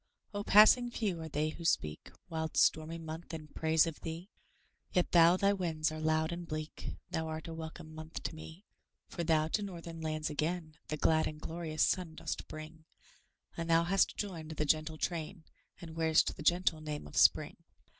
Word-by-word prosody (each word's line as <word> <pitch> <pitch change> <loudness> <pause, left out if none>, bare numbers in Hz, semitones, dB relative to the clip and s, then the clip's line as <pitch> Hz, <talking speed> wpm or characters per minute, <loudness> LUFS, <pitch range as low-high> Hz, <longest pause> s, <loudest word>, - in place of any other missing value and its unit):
Ah, 205 - -2
passing 215 +4 +7
few 200 -8 -2
are 160 - -6
they 150 +1 0
who 165 +2 -8
speak, 75 - 0 0.2
Wild, 160 -1 -3
stormy 160 +1 +3
month! 165 +1 -7
in 155 -1 -9
praise 160 +1 +3
of 165 -2 -6
thee; 165 +5 -6 0.6
Yet 180 - +1
though 170 +1 +7
thy 200 +1 +3
winds 160 -5 -1
are 155 - -5
loud 160 0 +1
and 170 0 -5
bleak, 155 0 -5 0.2
Thou 160 0 -1
art 160 0 -5
a 165 - -5
welcome 160 0 -8
month 160 +1 -7
to - - -3
me. 160 +5 -11 0.4
For 170 - -3
thou, 155 -1 +3
to 210 - 0
northern 170 -4 -7
lands, 155 0 -2
again 155 +1 -2
The 155 - -3
glad 160 +1 +3
and 150 - -6
glorious 160 -1 -2
sun 175 -4 0
dost - - -5
bring, 155 +1 -9 0.7
And 165 0 -4
thou 165 0 +5
hast 190 +3 +2
joined 170 -6 -4
the 155 -1 -1
gentle 155 +1 +1
train 165 +1 -3 0.4
And 165 -3 -9
wear'st 160 -1 +3
the - - -9
gentle 170 -1 +2
name 150 -1 -5
of 75 - -11
Spring. - - +4
160 Hz, 185 wpm, -33 LUFS, 155-170 Hz, 0.7 s, passing